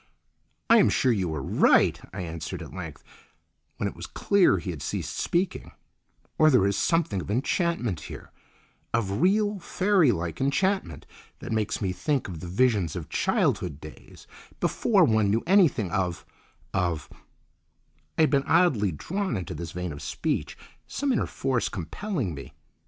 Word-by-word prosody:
"I 230 - +7
am - - +5
sure 130 - +2
you 95 -7 0
are 70 - -4
right," - - +3
I 95 +1 -5
answered 80 -2 -5
at - - -11
length, - - -8 0.7
when - - -1
it - - -6
was - - -7
clear 195 - +3
he 90 - -4
had 80 -5 -8
ceased - - -4
speaking; 175 +2 -1 0.7
"or 155 - +7
there 125 -9 +4
is 100 0 +1
something 160 - +1
of 85 - -9
enchantment 130 - 0
here—of 100 - -6
real 205 +2 +2
fairy 185 -5 +3
like 85 -2 -3
enchantment—that 185 - -2
makes 110 0 -1
me 95 - 0
think 135 +10 -1
of 90 -4 -7
the 90 - -7
visions 100 -4 +1
of 85 -4 -6
childhood 75 -6 0
days, 75 +1 -13 0.3
before - - +3
one 110 -2 +3
knew 110 +3 +1
anything 165 - +3
of—of—" 90 -2 -3 1.1
I - - +3
had 155 - +4
been 140 -2 +3
oddly 145 - +3
drawn 185 - -3
into 90 - -5
his 85 -1 -6
vein 90 -2 -4
of 70 - -9
speech, - - -3 0.3
some 285 -1 -1
inner - - 0
force 130 -3 -1
compelling 110 - -3
me. 70 -2 -9
110 Hz, 150 wpm, -26 LUFS, -, 1.1 s, I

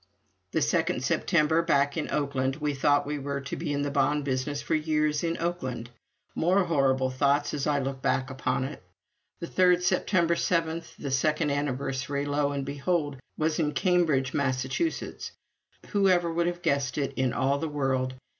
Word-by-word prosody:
The - - +1
second - - 0
September, 160 -1 +2
back 145 -4 +2
in 160 - -2
Oakland, 135 -2 0
we 150 -1 -2
thought 145 +1 +2
we 145 0 -3
were 140 0 -3
to 135 - -5
be - - -3
in 145 0 0
the 145 - -2
bond 145 0 +1
business 135 +2 -1
for 165 - -3
years 155 -1 +1
in 170 0 -1
Oakland. 130 -9 -3 0.4
More 185 +4 +2
horrible 135 -5 +1
thoughts 140 +2 +1
as 145 -1 -1
I 150 -1 +2
look 135 -1 -3
back 130 0 0
upon 130 0 -1
it. 140 +3 -6 0.6
The - - -2
third 180 0 +3
September 175 -1 +2
seventh, 165 -1 -1
the 140 - -5
second 150 +3 +1
anniversary, 140 0 -2
lo 145 0 0
and 140 -1 -3
behold, 145 +1 -1 0.2
was 155 +1 0
in 150 -2 +1
Cambridge, 165 -8 +2
Massachusetts! 135 - -2 0.6
Whoever 185 -4 +2
would 170 +1 +1
have 175 0 -3
guessed 140 -2 0
it, 140 -2 -1
in 130 -1 +1
all 135 +3 +1
the 160 - -2
world? 130 -3 -1
145 Hz, 170 wpm, -27 LUFS, 135-165 Hz, 0.6 s, third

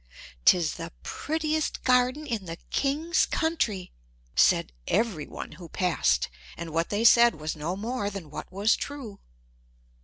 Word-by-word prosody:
"'Tis 170 -4 +4
the - - -6
prettiest 310 - -2
garden 255 +4 +3
in 225 -8 -3
the 165 -1 -5 0.2
king's 305 +5 +1
country," 235 - -1 0.4
said - - +4
every 195 -9 0
one - - -7
who 170 +1 -11
passed; 170 - +1 0.3
and 165 -1 -6
what 165 +1 0
they 210 +2 0
said 235 0 +7
was 155 0 -4
no 160 +4 -3
more 215 +1 -2
than 190 -7 -8
what - - -7
was 200 +3 +3
true. 255 -9 -7
205 Hz, 145 wpm, -27 LUFS, 170-260 Hz, 0.4 s, said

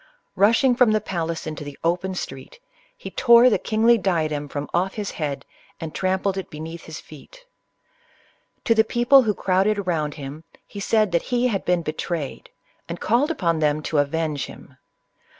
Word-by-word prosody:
Rushing 235 +5 +4
from 240 -3 +4
the 215 - +3
palace 165 -4 -4
intd 155 -2 -5
the 145 -1 -9
open 180 +3 0
street, 135 - -7 0.4
he - - -8
tore 235 0 +6
the - - +2
kingly 225 +1 +3
diadem 155 -6 -1
from 145 +1 -4
off 185 +3 0
his 210 -2 -4
head, 140 -3 -4 0.3
and 160 -1 -6
trampled 190 +1 0
it 190 - -7
beneath 160 +2 -8
his 160 -1 -8
feet. 330 - -15 1.2
To 230 - +4
the 220 -1 +4
people 240 +5 +5
who 215 -5 0
crowded 195 +2 +1
round 155 -5 -1
him, 145 +1 -8 0.2
he 200 - -9
said 215 0 +2
that 170 -1 +2
he 250 0 +2
had 195 -4 -2
been 180 -1 +1
be 155 - -3
trayed, 160 -4 -4 0.4
and 170 - -5
called 245 +7 +2
upon 170 - 0
them 150 0 +1
to 150 - 0
avenge 150 0 -1
him. - - -14
180 Hz, 175 wpm, -23 LUFS, 155-215 Hz, 1.2 s, tore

